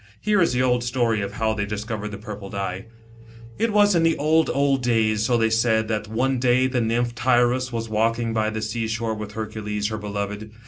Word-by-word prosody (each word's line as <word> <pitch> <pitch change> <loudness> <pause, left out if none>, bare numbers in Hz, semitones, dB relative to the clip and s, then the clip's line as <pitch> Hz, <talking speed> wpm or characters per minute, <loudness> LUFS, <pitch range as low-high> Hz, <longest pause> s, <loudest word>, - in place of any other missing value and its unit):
Here 210 -1 +2
is 165 - +2
the 125 +1 +1
old 125 -1 +2
story 120 -3 0
of 100 - -4
how 110 -2 0
they 105 -1 -2
discovered 105 0 -4
the 100 - -7
purple 105 -2 -8
dye. 95 0 -4 0.7
It 230 0 +1
was 205 -1 +4
in 170 - +3
the 165 -1 +2
old, 160 +2 +2
old 140 -1 +1
days, 110 -3 +1
so 120 +2 +2
they 110 -1 +2
said, 110 -1 +2
that 105 -1 -2
one 125 +4 0
day 125 +1 +3
the 130 -1 0
nymph 120 +1 0
Tyros 125 +1 +2
was 115 -1 -3
walking 115 +1 0
by 110 -1 +1
the 110 0 -4
sea 115 +1 -2
sho 110 +1 -2
v - - 0
e 110 - -7
with 105 -1 -7
Hercules, 105 -1 -3
her 110 -1 -4
beloved. 105 +1 -4
115 Hz, 225 wpm, -23 LUFS, 110-125 Hz, 0.7 s, was